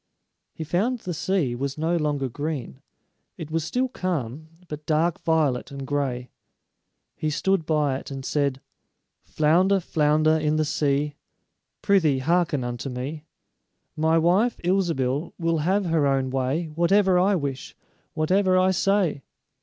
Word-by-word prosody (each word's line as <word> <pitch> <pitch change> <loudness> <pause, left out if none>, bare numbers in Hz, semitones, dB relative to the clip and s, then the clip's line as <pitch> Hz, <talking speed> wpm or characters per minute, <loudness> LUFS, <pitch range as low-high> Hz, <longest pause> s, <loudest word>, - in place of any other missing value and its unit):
He 160 - -5
found 195 - 0
the 180 -6 -5
sea 165 -6 0
was 135 +3 -4
no 165 +3 0
longer 145 -4 0
green; 140 - -5 0.6
it 155 -1 -7
was 165 0 0
still 255 +10 0
calm, 155 - -4 0.2
but 150 -1 -8
dark 160 +2 +1
violet 155 -6 +1
and 140 -1 -7
gray. 130 -3 -2 0.8
He 155 - -2
stood 180 +2 0
by 150 -4 +1
it - - -11
and 135 -1 -6
said: 140 -3 0 0.6
"Flounder, 180 +6 +2
flounder 155 -1 +2
in 150 0 +1
the 155 0 +1
sea, 145 0 0 0.7
Prythee, 165 -9 +3
hearken 160 0 +1
unto 120 +2 -4
me: 140 +5 -5 0.7
My 160 +1 +2
wife, 185 +9 +2
Ilsebil, 165 -6 0
will 165 -2 0
have 190 +6 +1
her 160 -4 +2
own 135 -1 0
way 135 +5 -1
Whatever 180 +4 +3
I 195 +2 +3
wish, 140 -5 -4 0.4
whatever 185 +4 +2
I 185 +1 +4
say." 190 -5 +1
155 Hz, 140 wpm, -24 LUFS, 140-175 Hz, 0.8 s, I